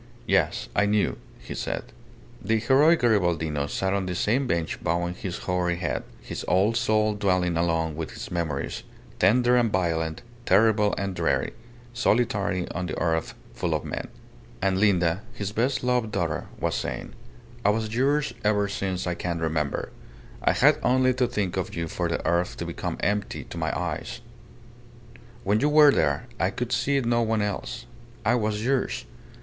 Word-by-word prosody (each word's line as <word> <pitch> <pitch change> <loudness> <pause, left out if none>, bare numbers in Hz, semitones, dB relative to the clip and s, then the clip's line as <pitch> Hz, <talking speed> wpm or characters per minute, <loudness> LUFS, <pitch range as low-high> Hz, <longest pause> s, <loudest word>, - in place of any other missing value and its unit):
"Yes. - - +1
I 100 0 +3
knew," 105 -1 +2 0.2
he - - -8
said. - - -4 0.5
The 110 +3 +2
heroic 135 +8 +4
Garibaldino 85 -10 +1
sat 95 0 -1
on 100 -2 -1
the 90 - -2
same 125 +9 +1
bench 85 -6 -2
bowing 85 +1 0
his 90 0 -5
hoary 90 -1 0
head, 85 -1 -2 0.2
his - - -5
old 100 +5 +3
soul 110 -2 +2
dwelling 90 -4 +1
alone 80 -2 0
with 80 0 -5
its - - -8
memories, 85 -3 -2 0.4
tender 120 +6 +4
and 120 -3 +3
violent, 80 -4 -1 0.2
terrible 105 +1 +4
and 100 -1 -2
dreary 85 -2 0 0.4
solitary 105 -7 +1
on 90 +1 -3
the - - -4
earth 80 -1 0 0.2
full - - -1
of - - -3
men. - - -4 0.5
And 95 +4 +1
Linda, 90 -3 +3
his 100 0 -3
best 125 +5 0
loved 125 -3 +1
daughter, - - -2
was - - 0
saying, - - -4 0.5
"I 100 - +4
was 110 +1 0
yours 140 +4 +1
ever 105 -1 +2
since 95 -2 -2
I 90 - 0
can 85 0 -3
remember. 80 -3 -1 0.5
I - - +4
had - - +4
only 130 0 +3
to 125 0 +1
think 100 -7 -2
of 95 - -3
you 85 -1 -2
for 85 +2 -2
the 85 - -2
earth 85 +1 +1
to - - -4
become - - -4
empty 105 0 -1
to - - -9
my - - 0
eyes. - - -4 1.2
When 105 +2 +2
you 145 - +2
were 150 -1 +7
there, - - +1
I 95 - +2
could 125 +5 -4
see 140 +2 +2
no 120 -1 +2
one 110 -2 +1
else. 100 -11 -4 0.4
I 110 - +4
was 110 -2 0
yours. 130 - 0
100 Hz, 170 wpm, -26 LUFS, 85-115 Hz, 1.2 s, were